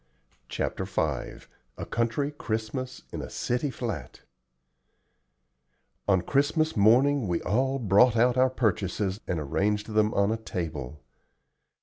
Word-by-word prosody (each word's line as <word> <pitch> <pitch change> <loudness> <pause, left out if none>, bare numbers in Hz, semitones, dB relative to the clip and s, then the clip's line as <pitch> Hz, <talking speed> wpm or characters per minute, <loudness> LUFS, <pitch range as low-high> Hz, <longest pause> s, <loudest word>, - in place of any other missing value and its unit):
CHAPTER - - -2
V - - -3 0.8
A - - -5
COUNTRY 120 +5 -1
CHRISTMAS 125 -1 -4
IN - - -4
A - - -7
CITY 125 +4 -1
FLAT 120 -4 -5 1.9
On 95 -3 +4
Christmas 145 - +1
morning 120 +4 +4
we 85 -1 0
all 130 +4 +1
brought 115 +1 +4
out 120 +1 +4
our 130 0 +4
purchases 100 -4 -1
and 85 - -1
arranged 105 +8 -1
them 105 0 +3
on 100 +1 +3
a 115 - 0
table. 75 - -5
110 Hz, 120 wpm, -27 LUFS, 100-130 Hz, 1.9 s, On